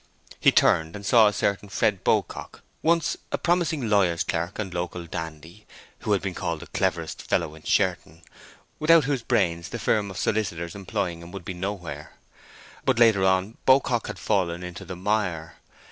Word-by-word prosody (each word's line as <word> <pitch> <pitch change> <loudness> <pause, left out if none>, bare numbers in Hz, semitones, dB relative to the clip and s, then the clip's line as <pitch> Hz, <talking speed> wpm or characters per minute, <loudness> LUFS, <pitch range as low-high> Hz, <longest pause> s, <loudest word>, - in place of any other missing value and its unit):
He - - +6
turned 80 0 +3
and 100 -1 -8
saw 110 0 +6
a - - +3
certain 100 +1 -1
Fred 100 -1 0
Beaucock—once 165 -1 -1
a - - 0
promising 170 -7 0
lawyer's 95 -6 +2
clerk 85 +3 -3
and 95 -5 -4
local 90 0 -4
dandy, 80 +4 -8 0.3
who 105 - 0
had 100 - 0
been 95 -2 -2
called 85 -2 -3
the - - -8
cleverest - - -2
fellow 80 -3 -1
in 80 - -13
Sherton, 80 +1 0 0.6
without 160 +1 +6
whose 135 -2 -1
brains 85 -5 0
the 120 - -4
firm 105 -2 +1
of 95 - -8
solicitors 85 -6 -1
employing 90 -4 -3
him 85 +1 -11
would 95 -3 -8
be 95 - -4
nowhere. 90 -6 -5 0.7
But 130 -3 +2
later 110 -5 +5
on 95 +4 +1
Beaucock 130 -3 +4
had - - -6
fallen 90 -4 0
into 90 -1 -7
the 95 - -6
mire. 90 -5 -2
95 Hz, 170 wpm, -25 LUFS, 85-110 Hz, 0.7 s, He